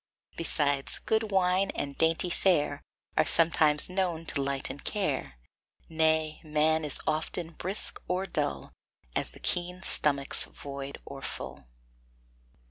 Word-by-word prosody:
Besides, 145 -4 +2
good 220 0 -1
wine 190 0 +2
and 140 -1 -4
dainty 165 +2 +1
fare 170 -5 +1 0.3
Are - - +4
sometimes 155 -2 +6
known 180 -3 -2
to 145 - -2
lighten 140 0 -2
care; 140 - -3 0.5
Nay, 160 -1 +1
man 155 +1 +1
is 150 -3 -3
often 160 +2 -2
brisk 190 +5 -4
or 180 +1 -1
dull, 70 - -3 0.4
As - - 0
the - - -16
keen 180 +1 -2
stomach's 140 -5 +2
void 140 0 -8
or 140 -1 -9
full. - - -7
160 Hz, 125 wpm, -28 LUFS, 145-180 Hz, 0.5 s, sometimes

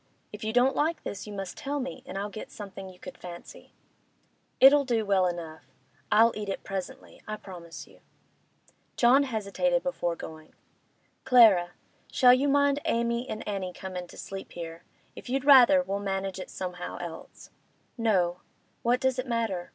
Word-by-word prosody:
If 210 +1 -8
you 220 - -1
don't 250 +3 +3
like 320 +3 0
this, 200 +1 -6
you 210 - -7
must 195 -2 -6
tell 285 +1 -3
me, 260 -1 -5
and 195 - -6
I'll 205 +1 -3
get 215 - -8
something 195 -2 -9
you 185 - -14
could - - -11
fancy.' 175 -1 -11 0.9
'It'll 280 +2 +8
do 235 -4 0
well 190 -2 +3
enough. 165 -3 -6 0.4
I'll 225 +2 +6
eat 210 -1 -5
it 195 - -4
presently; 190 -2 -7
I 215 - -3
promise 175 -5 -10
you.' - - -20 1.0
John 250 +3 +5
hesitated 260 +2 0
before 175 -11 -2
going. 155 -1 -11 0.7
'Clara—shall 235 +1 +4
you 265 +3 +2
mind 285 0 +3
Amy 235 +2 0
and 215 - -6
Annie 190 -3 -3
comin' 180 -1 -7
to - - -14
sleep 195 0 -8
here? 165 -1 -8 0.3
If - - -10
you'd 270 +1 -1
rather, 275 0 +7
we'll 200 -6 -3
manage 195 -1 -3
it 185 - -7
somehow 180 -1 -6
else.' 170 -2 -9 0.4
'No. 185 -7 +1 0.4
What 245 +2 +2
does 260 -1 0
it 255 - -3
matter? 225 -7 -2
210 Hz, 165 wpm, -28 LUFS, 185-255 Hz, 1.0 s, It'll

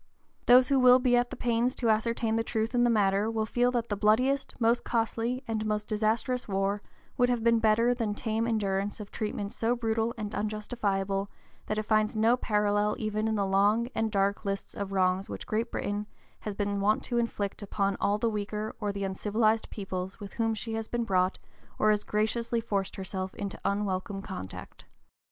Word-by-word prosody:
Those 250 +2 +7
who 275 -1 +4
will 250 0 +8
be 250 -1 +3
at 245 0 +2
the - - -6
pains 240 +1 0
to 235 -3 +2
ascertain 225 +1 0
the 225 - +1
truth 225 +1 -2
in 240 0 +3
the 240 - +4
matter 205 -1 +2
will 220 -1 -1
feel 245 +2 +2
that 235 -1 -1
the 205 - 0
bloodiest, 250 +8 +2
most 235 +1 +3
costly, 235 +2 -1
and 220 -1 -1
most 210 -1 -1
disastrous 225 +4 0
war 195 0 0 0.4
would 245 0 +3
have 240 -2 0
been 230 0 +4
better 225 +2 +3
than 225 -4 -2
tame 225 +1 -1
endurance 205 -2 -1
of 205 -1 -8
treatment 210 -2 -3
so 230 +2 0
brutal 225 0 -1
and 210 -1 -4
unjustifiable 205 -2 -1 0.4
that 215 - -1
it 215 - 0
finds 215 0 +2
no 225 +3 +4
parallel 210 -2 +1
even 215 0 -1
in 220 - 0
the 200 -2 +1
long 205 +5 +2
and 225 0 0
dark 200 0 +1
list 195 -1 -3
of 200 -1 -5
wrongs 185 0 +1
which - - -6
Great 225 +2 -1
Britain 205 +1 -2 0.3
has 210 -2 -5
been 200 -1 -1
wont 210 +2 +2
to 240 -1 0
inflict 210 -4 -2
upon 200 -1 -1
all 205 +1 +2
the 230 - 0
weaker 210 0 -3
or 205 -2 -1
the 200 0 -4
uncivilized 215 +3 +1
peoples 190 -1 -5
with 200 -2 -8
whom 225 -1 0
she 225 +1 -5
has 225 0 -3
been 240 -1 -1
brought 185 -3 +1 0.4
or 215 - +4
has 210 -1 +1
gratuitously 230 +2 0
forced 200 -4 -2
herself 190 -1 -5
into 200 -1 -5
unwelcome 195 -1 -1
contact. 95 - -8
215 Hz, 195 wpm, -29 LUFS, 200-230 Hz, 0.4 s, will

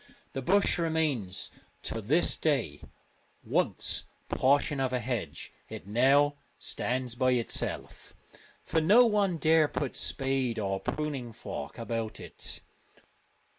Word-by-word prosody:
The 135 - -3
bush 195 +6 +3
remains 155 - 0 0.3
to 115 - -3
this 150 - +3
day: 120 - 0 0.6
once - - 0 0.2
portion 140 +1 +2
of 130 -1 0
a 125 - +1
hedge, 115 - -4 0.2
it - - -8
now 135 +7 +4 0.2
stands 125 -1 -2
by 130 +1 +2
itself, 120 -2 -3 0.5
for 160 - +1
no 210 +10 +7
one 205 -5 +2
dare 160 -1 +4
put 145 -2 -3
spade 135 -3 0
or 95 -2 -1
pruning 135 -3 -3
knife 75 +7 -5
about 115 -1 -3
it. - - -7
135 Hz, 120 wpm, -30 LUFS, 115-155 Hz, 0.6 s, no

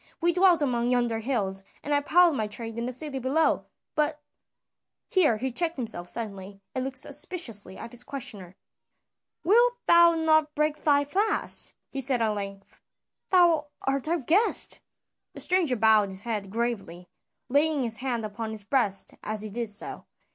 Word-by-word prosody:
"We 345 +1 +2
dwelt 360 -3 +4
among 240 -3 0
yonder 240 -2 +1
hills, 205 -6 -1 0.2
and 290 - -1
I 285 - +3
plied 345 +3 +4
my 220 -6 -1
trade 225 +2 -4
in 235 - -2
the - - -3
city 270 +1 -4
below, 275 +6 +1 0.3
but 300 -1 0 0.5
" - - -60
here 305 - +4
he 260 +4 -3
checked 335 +5 +1
himself 215 -8 -3
suddenly, 200 -3 -5
and 260 - -2
looked 265 0 -5
suspiciously 265 - -3
at 230 - -8
his 245 0 -4
questioner. 205 -10 -7 0.9
"Wilt 475 +7 +4
thou 340 0 +6
not 315 -2 +2
break 300 0 +1
thy 285 -1 +4
fast?" 405 +9 0 0.2
he 275 - -2
said 260 -1 +2
at 225 -1 +2
length. 200 -1 -6 0.5
"Thou 340 -5 +4 0.2
art 275 +1 -1
our 340 +2 +1
guest." 345 - +2 0.6
The - - -8
stranger 355 -8 +1
bowed 220 -2 +4
his 190 +1 -5
head 210 -4 -3
gravely, 195 -6 -3 0.4
laying 290 +1 +2
his 225 -2 -1
hand 240 -3 -2
upon 220 +2 -5
his 220 -2 -4
breast 205 -4 0
as 215 0 -3
he 215 - -6
did 230 +1 -3
so. 205 +1 -6
250 Hz, 170 wpm, -27 LUFS, 215-310 Hz, 0.9 s, thou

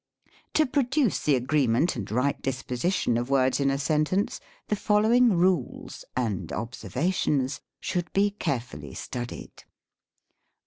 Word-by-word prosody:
To 310 - +5
produce 265 -2 +1
the 145 - +2
agreement 130 +3 +2
and 105 -5 -5
right 125 +6 0
disposition 130 +1 -1
of 120 +2 -4
words 130 -1 +3
in 140 -1 +2
a 135 - +1
sentence, 155 +7 0 0.3
the 210 - +1
following 220 +3 +4
rules 175 -6 0
(and 110 -7 -1
observa 130 +9 -2
tions 135 -6 0
?) - - -62
should 175 -2 -2
be 200 +1 +2
carefully 120 - -4
studied. 120 -1 -7
140 Hz, 130 wpm, -27 LUFS, 125-190 Hz, 0.3 s, To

